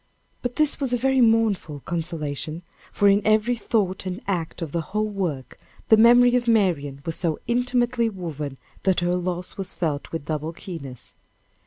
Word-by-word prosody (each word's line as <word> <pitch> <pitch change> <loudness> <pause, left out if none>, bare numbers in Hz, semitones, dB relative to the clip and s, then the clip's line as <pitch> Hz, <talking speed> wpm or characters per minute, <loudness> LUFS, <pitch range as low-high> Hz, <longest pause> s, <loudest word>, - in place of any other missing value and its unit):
But 245 0 -3
this 305 -1 +3
was 270 -3 0
a - - +3
very 265 +1 +2
mournful 220 - +2
consolation, 160 -1 -4 0.3
for 205 - +2
in 200 +1 +5
every 215 +3 +3
thought 195 -5 -1
and 185 0 -4
act 175 -4 -3
of 155 - -6
the 170 - -1
whole 215 +7 -2
work, 170 - -4 0.3
the 220 - +8
memory 245 +2 +6
of 245 -1 0
Marian 160 -11 +1
was 165 - -3
so 165 -3 -1
intimately 245 -1 +1
woven, 155 -8 -6 0.2
that 190 -1 +2
her 175 0 +1
loss 180 0 -3
was 195 -1 -4
felt 150 -4 -2
with 165 -3 -4
double 155 +1 -3
keenness. 140 -9 -9
185 Hz, 170 wpm, -24 LUFS, 160-225 Hz, 0.3 s, the